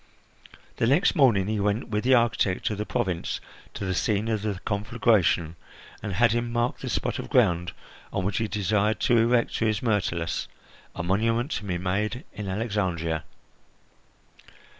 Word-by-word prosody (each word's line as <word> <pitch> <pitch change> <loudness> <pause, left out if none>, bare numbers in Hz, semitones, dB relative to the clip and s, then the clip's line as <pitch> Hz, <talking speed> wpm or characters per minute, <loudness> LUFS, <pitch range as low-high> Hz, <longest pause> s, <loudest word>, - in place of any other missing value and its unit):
The 115 - +2
next 150 +10 +4
morning 120 - +4
he 105 +1 -1
went 105 +4 0
with 105 -1 -1
the 130 +1 +5
architect 110 -5 +1
of 105 - -4
the 105 - -3
province 90 -3 -2 0.4
to 100 - -4
the 95 - -1
scene 105 +4 0
of 110 -2 0
the 105 -3 -3
conflagration, 100 -6 +1 0.4
and 105 -2 -4
had 115 +4 +4
him 120 +1 -1
mark 120 +1 0
the - - -5
spot - - -1
of - - -6
ground 85 -1 +2 0.4
on 90 - -2
which 100 +1 -1
he 110 - 0
desired 105 0 +1
to 120 - +4
erect 120 +1 +2
to 115 - 0
his 110 0 -1
Myrtilus 90 -7 -1 0.5
a 85 - -3
monument 115 - +1
to 105 - -3
be 90 -3 -1
made 100 +7 -2
in 105 -2 -6
Alexandria. 95 -7 -1
105 Hz, 165 wpm, -26 LUFS, 95-115 Hz, 0.5 s, the